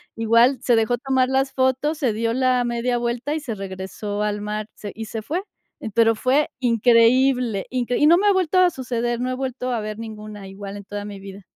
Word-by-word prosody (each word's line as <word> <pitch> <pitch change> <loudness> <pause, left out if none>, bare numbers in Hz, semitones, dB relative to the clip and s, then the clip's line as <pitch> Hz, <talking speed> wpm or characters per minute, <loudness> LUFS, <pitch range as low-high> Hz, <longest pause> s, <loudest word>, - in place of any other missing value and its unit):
igual 230 +4 +4
se 245 -2 +3
dejó 225 +2 +1
tomar 260 0 +1
las 270 0 0
fotos, 260 +4 +1
se 260 -6 +1
dio 230 +1 -1
la 255 -1 +2
media 240 +1 -1
vuelta 240 +5 -2
y - - -1
se 245 -7 -5
regresó 195 +2 -5
al 210 0 -2
mar, 210 0 -4
se 205 - -8
y 225 0 -6
se 220 0 -5
fue. 335 - -3 0.4
Eh, 220 - -6
pero 225 -1 +4
fue 270 +6 +1
increíble, 240 -1 +3
incre 245 -1 -1
y 300 - +5
no 340 +2 +7
me 405 - 0
ha 405 - +5
vuelto 370 -1 +1
a 365 -1 +5
suceder, 240 -2 -2
no 255 +1 -1
he 255 - -2
vuelto 255 -1 -3
a 235 - 0
ver 215 +1 -5
ninguna 215 -2 -8
igual 195 +1 -8
en 200 - -9
toda 205 0 -6
mi 200 -1 -8
vida. 195 0 -11
235 Hz, 225 wpm, -22 LUFS, 215-260 Hz, 0.4 s, no